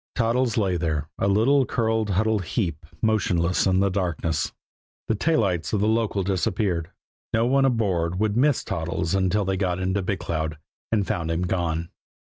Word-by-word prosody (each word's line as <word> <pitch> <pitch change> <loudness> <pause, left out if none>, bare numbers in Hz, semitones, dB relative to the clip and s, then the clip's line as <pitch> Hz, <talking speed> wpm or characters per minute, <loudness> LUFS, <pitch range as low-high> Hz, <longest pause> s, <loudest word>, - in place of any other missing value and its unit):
Toddles 120 0 +1
lay 95 -5 +1
there, 80 -3 -2
a - - +1
little, 120 +8 +4
curled, 110 -3 0
huddled 105 +1 +1
heap, 85 -5 -2 0.2
motionless 95 -5 +2
in 95 0 +3
the 100 -1 +2
darkness. 85 -4 -1 0.6
The - - +2
tail 155 +6 +2
lights 90 -5 -1
of 105 - +2
the 105 - +2
local 110 -3 +1
disappeared. 90 -2 -1 0.4
No 115 +1 +3
one 135 +2 +3
aboard 95 -8 0
would 105 -1 +1
miss 140 +2 +3
Toddles 85 +1 -2
until 95 +1 +1
they 95 0 0
got 90 -2 0
into 95 +2 0
Big 95 +1 -1
Cloud 80 -2 -3 0.3
and 105 -3 +2
found 85 -3 -2
him 80 +2 0
gone. 85 -2 -1
95 Hz, 170 wpm, -24 LUFS, 85-110 Hz, 0.6 s, little